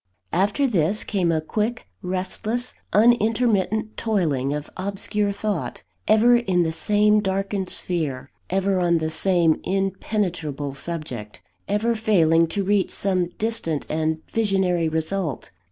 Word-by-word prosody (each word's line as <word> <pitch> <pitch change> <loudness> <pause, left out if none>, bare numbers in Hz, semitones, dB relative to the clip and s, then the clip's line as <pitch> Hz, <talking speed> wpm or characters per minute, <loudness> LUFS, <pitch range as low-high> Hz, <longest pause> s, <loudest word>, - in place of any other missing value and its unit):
After 205 +9 +2
this, 200 - +1
came 185 -5 0
a 160 -1 0
quick, 215 +9 -2 0.2
restless, 210 +6 -2 0.2
unintermittent 220 -1 +2
toiling 155 - 0
of 150 0 -3
obscure 200 +2 -1
thought, 200 - -3 0.2
ever 230 +3 +5
in 185 -7 +1
the 160 - -1
same 210 +5 +3
darkened 195 -1 -2
sphere, 150 -7 0 0.2
ever 195 0 +1
on 170 -1 +3
the 160 0 -2
same 170 -2 +2
impenetrable 185 -7 -2
subject, 135 -9 -5 0.3
ever 210 +4 +1
failing 170 -7 +3
to 200 +4 -2
reach 200 0 +1
some 185 -3 +1
distant 210 -9 -2
and 160 0 -1
visionary 190 -6 +1
result. 160 -1 -3
190 Hz, 120 wpm, -23 LUFS, 160-210 Hz, 0.3 s, ever